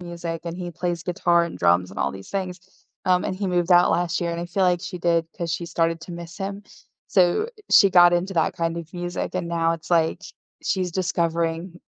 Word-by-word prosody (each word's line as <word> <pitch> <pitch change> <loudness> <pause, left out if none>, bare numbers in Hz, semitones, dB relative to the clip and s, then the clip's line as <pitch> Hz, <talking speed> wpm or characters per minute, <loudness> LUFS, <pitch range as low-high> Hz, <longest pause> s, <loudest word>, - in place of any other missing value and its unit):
music, 170 -1 -5
and 170 0 -5
he 175 -1 -5
plays 175 0 -3
guitar 175 0 +2
and 170 - -7
drums 90 +2 +3
and - - -9
all - - +1
these 95 0 -10
things, 185 -2 -3 0.4
um, 180 -1 +3
and 185 - -2
he 195 0 -2
moved 180 0 +1
out 175 0 +6
last 175 0 0
year, 170 - -1
and 170 - -4
I 175 - -4
feel 190 +2 -1
like 180 -1 +2
she 180 0 -6
did 170 -1 +1
'cause 170 -3 -3
she 170 +1 -3
started 165 0 0
to 175 - -8
miss 170 -1 -8
him, 200 +1 -4 0.5
so 185 - +3 0.2
she 195 -2 +7
got 175 -1 +7
into 180 +2 0
that 165 - +1
kind 165 0 -1
of 170 -1 -7
music, 175 +1 -4
and 175 -2 -2
now 165 -1 +1
it's 165 0 -8
like 165 +2 +2
sh 195 - -9 0.3
she's 185 -3 -1
discovering, 170 -1 -1
175 Hz, 225 wpm, -23 LUFS, 165-180 Hz, 0.5 s, she